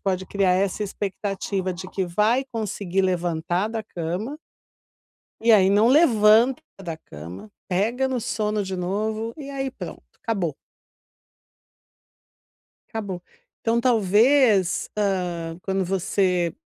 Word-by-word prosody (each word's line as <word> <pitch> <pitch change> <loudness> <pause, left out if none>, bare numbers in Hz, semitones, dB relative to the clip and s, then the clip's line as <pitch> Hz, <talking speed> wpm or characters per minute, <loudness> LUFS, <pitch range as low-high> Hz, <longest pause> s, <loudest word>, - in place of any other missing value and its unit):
pode 190 -1 -1
criar 195 -1 +1
é 190 +2 +3
essa 200 +2 -3
expectativa 195 -1 -3
de 185 +1 -8
que 190 0 -2
vai 210 +9 +2
conseguir 200 -4 -1
levantar 175 +1 0
da 225 0 -3
cama 180 - -4 1.1
e 230 +1 +4
aí 195 -3 +6
não 205 +3 +5
levanta 240 -3 +5 0.2
da 165 -3 -5
cama, 85 - -10 0.2
pega 225 +8 +1
no 260 -1 -1
sono 210 -2 -1
de 190 -1 -4
novo 215 +5 -2
e 280 -2 -7
aí 270 -1 -3
pronto, - - -8 0.2
acabou. 190 - -1 2.3
Acabou. 200 -6 -5 0.4
Então, 230 +1 +2
talvez, 225 -2 +3
ah, 180 -5 -1
quando 195 0 0
você 180 -2 +1
200 Hz, 120 wpm, -24 LUFS, 180-225 Hz, 2.3 s, aí